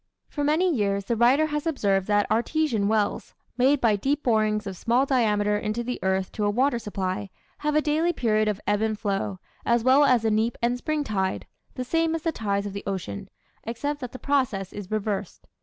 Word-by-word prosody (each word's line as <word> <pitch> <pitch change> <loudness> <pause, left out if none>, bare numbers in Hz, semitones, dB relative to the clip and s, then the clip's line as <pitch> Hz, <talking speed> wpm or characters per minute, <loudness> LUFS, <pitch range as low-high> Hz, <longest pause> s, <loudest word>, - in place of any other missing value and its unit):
For 290 - -3
many 310 +6 +2
years 200 -5 0
the 235 - 0
writer 250 +7 +4
has 300 +1 -3
observed 200 - +1
that 205 -1 +3
artesian 235 -2 +1
wells, 215 -1 -1 0.2
made 260 +3 +3
by 230 -4 +3
deep 275 +8 -1
borings 215 -2 +1
of 195 -1 -5
small 240 +8 +2
diameter 210 -6 +2
into 215 +3 -2
the 250 +1 -4
earth 190 0 0
to 210 - -3
a 205 - +2
water 245 +3 +1
supply, 195 -2 -3 0.3
have 300 0 -1
a 305 - +4
daily 315 +3 +2
period 215 -7 +1
of 210 -2 -1
ebb 205 +1 +1
and 220 -1 0
flow, 200 -2 -2 0.3
as 235 -1 +2
well 260 +3 +5
as 250 -5 +3
a 220 - +3
neap 220 +2 +1
and 240 +1 +1
spring 310 +2 -1
tide, 190 -6 -2 0.3
the 255 - -3
same 325 +4 +1
as 325 - -5
the 330 - +1
tides 200 -6 -2
of 200 - -5
the 200 - -6
ocean, 180 - -4 0.3
except 285 +6 -3
that 250 -2 -6
the - - -8
process 255 -10 -1
is 205 -2 -7
reversed. 215 -2 -3
225 Hz, 205 wpm, -25 LUFS, 205-275 Hz, 0.3 s, well